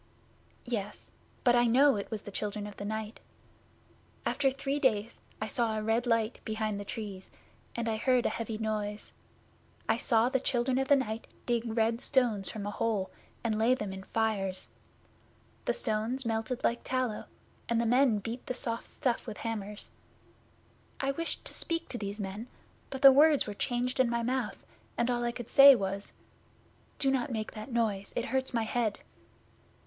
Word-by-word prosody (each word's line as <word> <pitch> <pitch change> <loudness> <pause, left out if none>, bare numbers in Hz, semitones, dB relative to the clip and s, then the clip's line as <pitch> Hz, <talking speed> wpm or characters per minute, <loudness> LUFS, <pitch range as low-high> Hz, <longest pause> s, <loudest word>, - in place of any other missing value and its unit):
'Yes 220 -5 -4 0.3
but 245 -1 +5
I 240 0 +5
know 270 +4 +5
it 200 - -4
was 220 -3 -4
the 205 - -8
Children 205 +1 -3
of 205 -1 -8
the 200 - -5
Night. 220 +1 -4 1.1
After 275 -2 +2
three 275 +2 -2
days 230 -4 +1 0.2
I 215 - -1
saw 220 0 0
a 215 - -2
red 225 +3 +1
light 230 -1 +1
behind 215 -2 -2
the - - -4
Trees, 200 -3 -6 0.4
and 235 -1 -2
I 220 -1 0
heard 255 +1 +2
a - - +4
heavy 225 -1 -4
noise. 215 -1 -3 0.7
I 225 - +3
saw 230 0 +3
the 265 +1 +1
Children 250 0 +1
of 270 - 0
the 285 - +7
Night 225 -4 -2 0.2
dig 240 -1 +1 0.2
red 230 +1 +2
stones 230 -7 +1
from 210 -2 -5
a 205 - -2
hole, 205 -3 -1 0.3
and 220 -2 0
lay 235 +3 +4
them 210 -6 -4
in 190 - -7
fires. 195 -3 -1 1.0
The - - +2
stones 235 - -1
melted 225 +2 -2
like 235 - +1
tallow, 255 -4 -1 0.4
and 235 -1 +2
the 235 - +1
men 245 -1 +4
beat 225 +5 -6
the 255 - -2
soft 230 -2 -3
stuff 245 -1 -1
with 220 - -5
hammers. 210 -2 -4 1.1
I 275 0 +1
wished 330 +4 -3
to - - -8
speak 335 0 -1
to 240 - -3
these 205 +1 -4
men, 205 +4 -5 0.4
but 270 +1 -6
the 275 - +12
words 295 +2 +5
were 210 - -5
changed 245 +4 -1
in 255 -2 +4
my 235 0 0
mouth, 250 -1 -2 0.3
and 235 +1 +2
all 240 0 0
I 240 - +1
could 240 -1 -8
say 275 0 +10
was, 195 -2 -2 0.8
"Do 270 - +2
not 265 +1 0
make 220 -3 -3
that 215 +3 -8
noise. 215 -4 0
It 240 - 0
hurts 265 0 -1
my 230 -2 +1
head." 220 -1 -1
230 Hz, 180 wpm, -31 LUFS, 215-250 Hz, 1.1 s, the